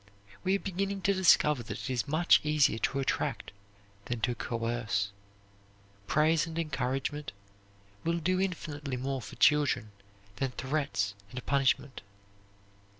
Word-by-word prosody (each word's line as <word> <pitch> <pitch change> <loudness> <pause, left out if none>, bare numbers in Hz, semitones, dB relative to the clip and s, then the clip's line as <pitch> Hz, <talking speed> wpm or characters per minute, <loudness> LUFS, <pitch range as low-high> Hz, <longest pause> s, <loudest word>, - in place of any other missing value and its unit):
We 190 +1 +2
are - - 0
beginning 195 +1 -2
to 200 - +3
discover 155 -7 +4
that 115 - -6
it - - -4
is 125 +3 -1
much 160 +4 +4
easier 150 -6 +3
to 135 - 0
attract 135 - -1 0.5
than 120 -1 -3
to 125 - +1
coerce. 115 -4 -2 1.0
Praise 155 +2 +3
and 165 0 -6
encouragement 140 -2 -2 0.7
will 170 +1 +1
do 185 +3 +1
infinitely 145 -7 -3
more 135 +1 -2
for - - -9
children 145 -8 +3 0.5
than 130 +3 -1
threats 130 -8 -1 0.2
and 125 +4 -7
punishment. 135 -1 +1
140 Hz, 130 wpm, -30 LUFS, 125-165 Hz, 1.0 s, discover